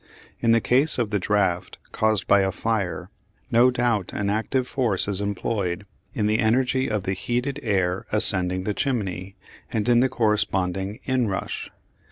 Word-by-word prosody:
In 115 - +2
the 115 - +5
case 135 +8 +2
of 115 -4 -1
the 105 - +1
draught 95 -3 0
caused 110 -3 +1
by 100 - +5
a 95 0 +1
fire 105 -3 -2 0.4
no 120 +2 +6
doubt 120 -6 0
an 100 -1 -1
active 125 +4 -1
force 115 -10 0
is 100 -1 -2
employed 100 -2 -2 0.3
in 110 -5 0
the 110 +1 +2
energy 130 +3 +2
of 105 -3 -1
the 95 - -1
heated 125 +8 -2
air 95 -4 0
ascending 95 -4 +2
the 105 - -1
chimney, 95 -6 -2 0.4
and 110 0 -1
in 120 -1 +5
the 130 +2 +3
corresponding 100 -2 0
inrush. 125 -7 -2
105 Hz, 160 wpm, -24 LUFS, 95-120 Hz, 0.4 s, no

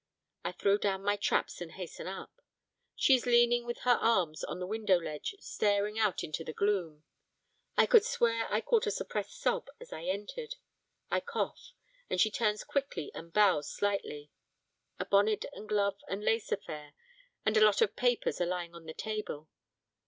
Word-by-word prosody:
I - - -2
throw 200 +1 +2
down 195 -1 0
my 205 +1 +2
traps 205 - 0
and 165 -2 -7
hasten 180 -2 -7
up. 190 +1 -8 0.5
She 270 - +5
is 250 -1 +2
leaning 240 0 +4
with 240 - -4
her 245 -1 +4
arms 185 -9 +2
on - - -4
the 180 - -3
window 205 -1 +2
ledge 155 - -5
staring 205 - 0
out 210 -5 +1
into 155 +1 -4
the 155 - -6
gloom. 175 -7 0 0.7
I - - +7
could 465 -3 +7
swear 230 - +1
I 215 - +2
caught 455 - +2
a - - +3
suppressed - - -4
sob - - 0
as - - -10
I 160 - -7
entered. 210 - -4 0.6
I - - +3
cough, - - -4 0.4
and - - -1
she 215 - +4
turns 210 -1 0
quickly 275 - -2
and 170 0 -9
bows 190 -7 +4
slightly. 175 -8 -2 0.7
A - - -1
bonnet 205 +2 +3
and 215 - -10
gloves 200 -1 +1
and 195 +2 -4
lace 225 0 +1
affair 150 -1 -5 0.5
and 215 0 +2
a 215 - +5
lot 210 -2 +5
of 205 - -1
papers 245 -6 +1
are 175 - +2
lying 175 -1 -3
on 170 -1 -12
the 160 - -7
table. 210 -9 -4
205 Hz, 180 wpm, -32 LUFS, 180-230 Hz, 0.7 s, I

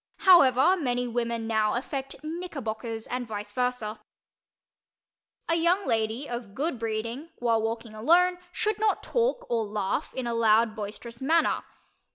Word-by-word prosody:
However, 340 -3 +6
many 245 -6 -1
women 235 -1 -2
now 220 -1 +1
affect 270 +2 -4
"knickerbockers" 255 -9 -5
and 250 -1 -4
vice 205 -1 -6
versa. 250 -2 -2 1.5
A 330 - +2
young 345 +4 +2
lady 225 +4 -1
of 235 -4 -6
good 290 -3 -2
breeding, 230 +7 -3
when 230 -2 +1
walking 225 0 -3
alone, 350 +11 +3
should 430 +3 -1
not 430 -1 +1
talk - - 0
or 230 -2 0
laugh 210 +5 -2
in 260 - -3
a 235 - -1
loud 225 -1 +3
boisterous 225 +3 -7
manner. 320 +5 +2
240 Hz, 140 wpm, -27 LUFS, 225-315 Hz, 1.5 s, However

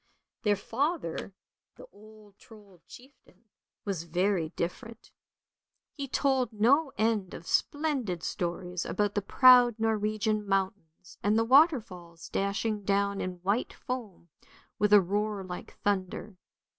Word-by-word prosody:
Their 210 -3 +2
father, 225 - -3 0.4
the - - -12
old 215 -1 -18
Trold 205 -6 -17
chieftain, 250 -6 -17 0.4
was 195 -5 -2
very 175 0 0
different; 225 +6 -6 0.8
he 280 -2 -5
told 265 -3 +1
no 270 +8 +3
end 215 -3 0
of 170 - -10
splendid 270 - -1
stories 180 0 -3
about 205 -1 -1
the 205 - 0
proud 245 +2 +6
Norwegian 215 -1 0
mountains, 190 -3 -3
and 210 +2 +2
the 225 - +2
waterfalls 225 - +2
dashing 205 +2 -1
down 200 0 0
in 180 -1 -6
white 200 +6 0
foam 220 -9 -7 0.5
with 210 0 +2
a 205 -1 +8
roar 205 +2 -2
like 180 -1 -9
thunder. 200 0 -2
205 Hz, 120 wpm, -29 LUFS, 185-230 Hz, 0.8 s, a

